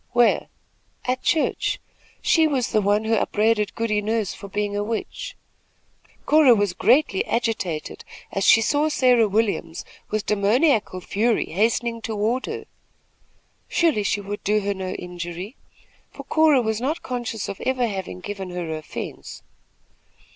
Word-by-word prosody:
"Where?" 240 -1 +3 0.6
"At 255 +1 -1
church. 320 - 0 0.4
She 320 -1 +4
was 265 -5 0
the 215 - +3
one 205 +2 +2
who 220 +1 0
upbraided 210 -1 +1
Goody 220 -2 0
Nurse 215 -2 -1
for 200 - -10
being 205 +1 -2
a 205 - 0
witch." 220 +1 -4 0.9
Cora 295 -5 +6
was 205 -3 0
greatly 230 -1 +3
agitated, 220 -9 -2 0.3
as 195 - -1
she 225 - +6
saw 295 +5 +2
Sarah 250 -6 +4
Williams, 205 -5 -1 0.2
with 215 0 -2
demoniacal 210 - +2
fury, 220 +5 0
hastening 230 +5 0
toward 225 +3 -1
her. - - -5 1.0
Surely 320 -11 +2
she 205 0 0
would 205 +1 -6
do 210 +1 +2
her 200 0 -1
no 190 -1 -5
injury, 180 +5 -6 0.5
for - - -10
Cora 310 -5 +4
was 220 0 -1
not 300 +6 -2
conscious 240 -4 -4
of 195 - -6
ever 255 -1 +1
having 190 -4 -5
given 195 -1 -6
her 175 -3 -4
offence. 155 0 -7
215 Hz, 140 wpm, -23 LUFS, 200-245 Hz, 1.0 s, Cora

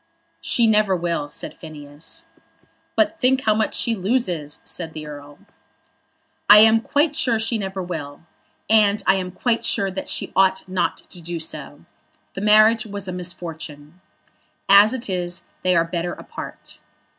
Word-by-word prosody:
"She 235 - +2
never 210 -3 +3
will," 170 -4 -2
said - - -7
Phineas. 155 - -9 0.7
"But 325 +1 +1
think 260 +1 +2
how 215 - +3
much 215 0 -1
she 235 - +1
loses," 185 - -2
said 165 -3 -5
the 155 -1 -7
Earl. 145 -1 -10 1.1
"I 205 - +11
am 225 0 +6
quite 295 +5 +1
sure 240 -4 +1
she 225 +1 -1
never 190 -1 -4
will. 155 -4 -7 0.4
And 210 -1 +3
I - - +5
am 185 -1 -3
quite 230 +6 -1
sure 195 -1 0
that 190 - -6
she - - -3
ought 190 0 +2
not 185 -2 -1
to 180 - -9
do 170 0 -5
so. 150 -2 -7 0.5
The 195 - -6
marriage 215 +1 +5
was 200 -2 -6
a - - -3
misfortune. 170 -2 -7 0.7
As 200 +2 +7
it 260 -1 -4
is 180 -2 -2 0.2
they 180 -1 +2
are 165 0 +3
better 170 +1 -3
apart." - - -10
190 Hz, 155 wpm, -22 LUFS, 165-220 Hz, 1.1 s, I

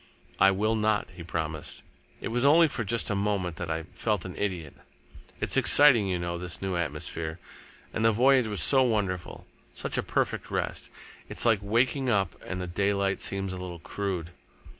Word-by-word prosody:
"I 95 - +6
will 105 +3 0
not," 110 -1 0
he 90 - -10
promised. 80 -2 -5 0.4
"It - - -4
was 120 +2 -1
only 160 +4 +6
for 125 -5 -4
just 115 +2 0
a - - 0
moment 100 -4 -1
that 85 - -5
I 80 0 -2
felt 105 -5 -2
an 90 - -7
idiot. 90 -8 -4 0.7
It's - - -1
exciting, 135 -8 +7
you 90 -1 -1
know, 85 0 -4
this 90 0 -4
new 95 -2 -3
atmosphere, 80 0 -4 0.6
and 110 - -2
the 115 - +5
voyage 125 +2 +3
was 105 -3 -1
so 135 -1 +5
wonderful, 100 -7 -2 0.3
such - - -2
a - - +2
perfect - - -2
rest. - - -3 0.4
It's - - 0
like 115 -3 +4
waking 125 +6 0
up, 100 -7 +1
and 95 - -5
the 90 - -3
daylight 100 +2 0
seems 95 -1 -2
a - - -6
little 90 -1 -7
crude." 90 -1 -4
100 Hz, 185 wpm, -27 LUFS, 90-110 Hz, 0.7 s, exciting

